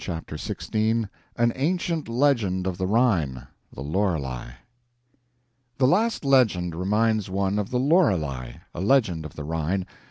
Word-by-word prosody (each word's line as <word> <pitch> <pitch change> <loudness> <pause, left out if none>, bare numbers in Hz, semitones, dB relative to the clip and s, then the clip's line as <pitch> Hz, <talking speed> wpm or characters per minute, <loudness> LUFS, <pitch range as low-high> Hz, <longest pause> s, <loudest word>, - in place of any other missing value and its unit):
CHAPTER 80 -3 -5
XVI 110 +7 -1 0.3
An 120 0 +2
Ancient 165 +1 -1
Legend 115 -8 +1
of 95 -1 -3
the 95 - 0
Rhine 90 - +1 0.3
[The 70 - -8
Lorelei] 75 -8 -2 1.2
The 135 - +3
last 205 - +2
legend 110 -11 +3
reminds 105 +4 +1
one 100 +1 0
of 105 - -3
the 125 - 0
"Lorelei" 90 - +2 0.2
a 85 - -5
legend 100 - +2
of 75 - -9
the 75 - -6
Rhine. 80 +5 -1
100 Hz, 135 wpm, -25 LUFS, 80-125 Hz, 1.2 s, The